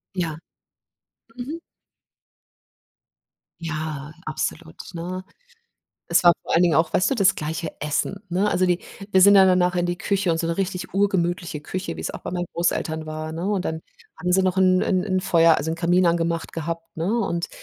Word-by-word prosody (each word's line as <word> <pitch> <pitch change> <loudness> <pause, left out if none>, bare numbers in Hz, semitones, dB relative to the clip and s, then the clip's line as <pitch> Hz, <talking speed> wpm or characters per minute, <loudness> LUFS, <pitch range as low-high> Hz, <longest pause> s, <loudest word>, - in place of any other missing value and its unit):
Ja. 165 -4 -2 1.0
Mhm. 295 +7 -5 2.0
Ja, 155 -3 -4
absolut, 80 - -4 0.2
ne? 180 +2 -5 0.9
Es 170 +1 +3
war 175 - +9
vor - - -2
allen 170 - +5
Dingen 170 -4 +3
auch, 160 +2 +2
weißt 185 - +3
du, - - +2
das 195 -5 +4
gleiche 160 +2 -4
Essen, 150 +7 -2
ne? 195 +4 +1
Also, 185 - +2
die 180 -1 +2 0.3
wir 190 - +4
sind 200 +2 +8
ja 195 -1 +8
danach 180 -1 +3
in 175 0 +1
die 175 0 -2
Küche 195 -3 0
und 165 - +1
so 165 - -1
'ne 165 - -1
richtig 190 -1 -3
urgemütliche 175 -5 0
Küche, 185 +5 -5
wie - - -6
es - - -3
auch - - -8
bei - - -5
meinen 175 -1 -2
Großeltern 160 -2 -1
war, 155 0 -5
ne? 170 +4 -4
Und 200 -3 0
dann 160 0 -3 0.4
haben 180 0 -1
sie 190 +1 +4
noch 185 0 +1
'n 185 -1 +4
'n 185 0 +1
'n 185 -2 0
Feuer 165 -2 +4
also, 160 - -3
'n - - -1
Kamin 175 +2 +2
angemacht 170 0 0
gehabt, 165 +1 -5
ne? 170 +7 -1
Und 170 -5 -1
175 Hz, 190 wpm, -23 LUFS, 165-185 Hz, 2.0 s, war